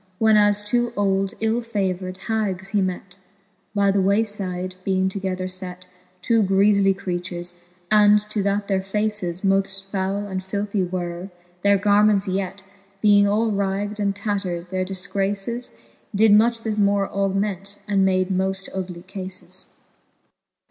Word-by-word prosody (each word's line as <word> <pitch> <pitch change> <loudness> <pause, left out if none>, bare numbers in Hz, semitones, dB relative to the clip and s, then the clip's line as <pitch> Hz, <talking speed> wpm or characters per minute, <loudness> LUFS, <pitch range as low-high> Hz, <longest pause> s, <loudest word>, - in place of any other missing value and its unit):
When 220 +1 +4
as 205 0 +4
two 240 +2 0
old 195 -1 +1
ill 225 +2 +1
favour'd 190 -5 -2
hags 200 -4 -1
he 205 -1 +1
met, 185 0 -4 0.6
By 200 -1 +3
the 195 0 +2
way 200 +3 +3
fide 185 -4 -4
being 190 0 +1
together 185 -1 -3
fet. 185 -1 -6 0.4
Two 230 -2 +3
griefly 195 0 +3
creatures; 175 -1 -4 0.4
and, 210 -1 +6
to 210 - 0
that 200 +1 0
their 195 -2 +1
faces 195 -3 -1
Moft 195 0 +1
foule 195 +1 -1
and 190 -1 -3
filthie 200 -1 -2
were, 175 0 -4 0.3
their 200 +1 +4
garments 205 0 +3
yet 190 +1 -3 0.4
Being 205 -1 +5
all 215 +2 +2
ragd 200 +1 -1
and 200 -1 0
tatter'd, 195 -4 -3
their 185 0 -1
difgraces 195 +5 -2 0.4
Did 215 +1 +5
much 230 +2 +4
the 220 -2 -2
more 200 -1 +2
augment, 195 0 -2
and 200 -2 +2
made 185 0 +2
moft 190 +1 -1
ugly 180 -2 -5
cafes. 185 -1 -7
195 Hz, 140 wpm, -23 LUFS, 185-205 Hz, 0.6 s, and